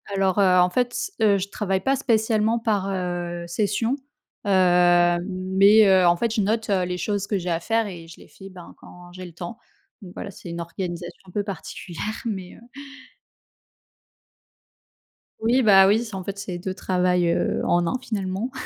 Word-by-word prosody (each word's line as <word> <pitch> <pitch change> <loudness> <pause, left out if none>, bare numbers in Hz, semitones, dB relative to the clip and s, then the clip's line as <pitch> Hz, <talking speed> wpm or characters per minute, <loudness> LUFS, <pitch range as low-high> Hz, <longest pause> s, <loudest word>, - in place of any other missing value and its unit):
Alors, 195 0 +1
heu, 185 -2 +5
en 180 - +3
fait 245 +5 0
s 390 - -3
heu, 205 -2 +4
je 195 +1 -4
travaille 195 -3 -2
pas 270 +4 +1
spécialement 225 -3 +1
par, 210 -4 -1
heu, 175 -2 -3
session, 210 +7 0 0.5
heu, 205 - -2 0.8
mais 195 +3 +4
heu, 190 -2 +5
en 175 - +5
fait, 230 +4 -1
je 215 - +1
note, 220 +2 -1
heu, 190 -2 +2
les 180 0 -3
choses 200 +1 -2
que 205 - 0
j'ai 180 -1 -4
à 165 -1 0
faire 225 +2 0
et 170 -4 -9
je 165 - -13
les - - -15
fais, 195 0 -13
ben, 180 -2 -12
quand 175 0 -14
j'ai 185 0 -9
le 175 - -10
temps, 175 +7 -8 0.4
donc 180 -3 -11
voilà, 200 - -6
c'est 175 - -11
une 170 0 -5
organisation 175 0 -6
un - - -13
peu 205 +1 -2
particulière 190 -3 -7 0.2
mais 190 -5 -5
heu. 235 - -18 2.7
Oui, 240 +4 +2
bah, 195 -3 +7
oui, 215 +4 +3
c'est 220 -3 -9
en 190 - -4
fait 200 0 -6
c'est 185 -3 -5
2 185 +1 -5
travails, 180 -2 +1
heu, - - -1
en 175 0 +2
1, 210 - -1
finalement 205 0 -3
195 Hz, 190 wpm, -23 LUFS, 180-215 Hz, 2.7 s, bah